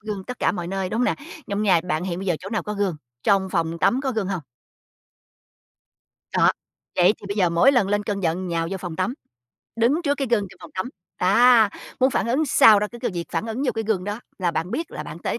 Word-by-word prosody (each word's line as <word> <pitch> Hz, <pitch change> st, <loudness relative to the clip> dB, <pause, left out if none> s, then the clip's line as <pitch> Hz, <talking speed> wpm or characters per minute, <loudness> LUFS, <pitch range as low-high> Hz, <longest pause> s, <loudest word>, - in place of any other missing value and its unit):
gương 205 Hz, -3 st, -5 dB
tất 250 Hz, -, -7 dB
cả -, -, +2 dB
mọi 175 Hz, -3 st, -4 dB
nơi, 190 Hz, +1 st, -2 dB
đúng 220 Hz, -, -2 dB
hông -, -, +3 dB
nè? -, -, +2 dB, 0.3 s
Trong 200 Hz, +1 st, -1 dB
nhà 185 Hz, -5 st, +4 dB
bạn 160 Hz, 0 st, 0 dB
hiện 180 Hz, -1 st, -3 dB
bây 195 Hz, -, -5 dB
giờ 180 Hz, -, +2 dB
chỗ 190 Hz, -, -7 dB
nào 220 Hz, -, -1 dB
có 210 Hz, -, -4 dB
gương, 195 Hz, -5 st, -1 dB, 0.3 s
trong 195 Hz, -2 st, +2 dB
phòng 165 Hz, -2 st, -1 dB
tắm 245 Hz, +10 st, +2 dB
có 265 Hz, -2 st, -1 dB
gương 210 Hz, -4 st, -2 dB
hông? 185 Hz, -4 st, -3 dB, 1.9 s
Đó, -, -, +5 dB, 0.5 s
vậy 180 Hz, +3 st, +5 dB
thì -, -, -10 dB
bây 200 Hz, -, -3 dB
giờ 185 Hz, -4 st, +3 dB
mỗi 170 Hz, +12 st, +4 dB
lần 240 Hz, -7 st, +2 dB
lên 205 Hz, +1 st, +1 dB
cơn 205 Hz, -1 st, -3 dB
giận 180 Hz, +2 st, -1 dB
nhào 165 Hz, -1 st, -1 dB
vô 195 Hz, -, -2 dB
phòng 175 Hz, -3 st, -6 dB
tắm, 210 Hz, +7 st, -1 dB, 0.6 s
đứng 255 Hz, +9 st, +2 dB
trước 285 Hz, -2 st, +1 dB
cái 275 Hz, -1 st, -2 dB
gương 210 Hz, -4 st, +2 dB
trong -, -, -16 dB
phòng -, -, -11 dB
tắm, 185 Hz, +6 st, -2 dB, 0.3 s
à, 225 Hz, +3 st, +5 dB, 0.3 s
muốn 260 Hz, +1 st, +4 dB
phản -, -, 0 dB
ứng 285 Hz, +6 st, +1 dB
sao 215 Hz, -5 st, +7 dB
đó 210 Hz, -, 0 dB
cứ 240 Hz, -, -9 dB
cứ -, -, +1 dB
việc 170 Hz, -1 st, -3 dB
phản 225 Hz, -, -1 dB
ứng 225 Hz, +5 st, -3 dB
vô 270 Hz, -, +1 dB
cái 225 Hz, 0 st, -2 dB
gương 200 Hz, -5 st, 0 dB
đó 205 Hz, +3 st, -4 dB, 0.2 s
là 180 Hz, -3 st, +1 dB
bạn 170 Hz, +2 st, -3 dB
biết 330 Hz, +7 st, -3 dB
là -, -, -6 dB
bạn 165 Hz, -, -8 dB
tới -, -, -3 dB
200 Hz, 255 wpm, -23 LUFS, 180-230 Hz, 1.9 s, sao